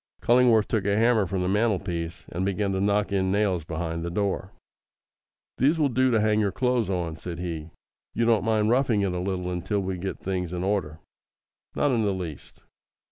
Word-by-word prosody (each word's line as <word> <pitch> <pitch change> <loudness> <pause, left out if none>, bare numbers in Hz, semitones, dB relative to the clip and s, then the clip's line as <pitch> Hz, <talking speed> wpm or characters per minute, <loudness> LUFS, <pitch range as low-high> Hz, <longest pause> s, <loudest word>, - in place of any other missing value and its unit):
Cullingworth 120 -3 +4
took 110 -4 -1
a 100 0 +2
hammer 115 -3 +3
from 90 +1 -2
the - - 0
mantelpiece, 95 -5 -1
and 90 +2 -3
began 100 +1 0
to 95 0 -1
knock 100 0 +1
in 95 -1 +1
nails 100 -4 +1
behind 80 +1 -4
the 85 - -3
door. 95 0 -2 1.1
"These 145 +6 +3
will 150 -3 +2
do 130 +1 +2
to 115 -3 +3
hang 105 0 +2
your 100 -2 +1
clothes 125 -4 0
on," 85 -4 -2
said 85 0 -6
he; 85 -3 -5 0.5
"you 115 - +1
don't 115 -2 +3
mind 110 -1 +2
roughing 120 -4 +2
it 100 -2 0
a 90 - -2
little 90 -1 -2
until 90 +4 -1
we 95 -1 -3
get 95 +2 -4
things 90 -2 -3
in 90 0 -3
order?" 95 -6 -2 0.7
"Not 145 - +2
in 120 -3 +2
the 100 -2 +1
least." 85 -6 -8
100 Hz, 195 wpm, -26 LUFS, 90-110 Hz, 1.1 s, Cullingworth